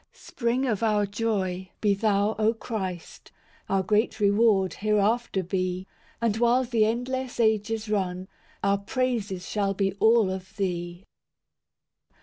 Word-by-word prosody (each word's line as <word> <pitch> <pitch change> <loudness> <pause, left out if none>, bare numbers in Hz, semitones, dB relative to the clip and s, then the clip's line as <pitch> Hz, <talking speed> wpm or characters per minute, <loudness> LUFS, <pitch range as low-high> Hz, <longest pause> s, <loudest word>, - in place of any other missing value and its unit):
V - - -26
Spring 245 +2 -1
of 225 -5 -1
our 210 -2 +2
joy, 195 -3 -2
be 205 -2 +3
Thou, 205 +1 +1
O 220 +2 +2
Christ; 190 -7 -6 0.4
Our 195 -1 +2
great 215 +4 +1
reward, 205 -2 +3
hereafter 210 0 +1
be; 185 0 -2 0.3
And 225 -2 0
while 240 +2 +3
the 235 -3 +2
endless 250 +3 -2
ages 220 0 +1
run, 190 -3 -2 0.4
Our 200 0 +2
praises 205 -4 -2
shall 200 -2 -1
be 195 -1 0
all 220 -3 +4
of 190 0 -7
Thee. 175 -1 -3
210 Hz, 130 wpm, -26 LUFS, 190-225 Hz, 0.4 s, all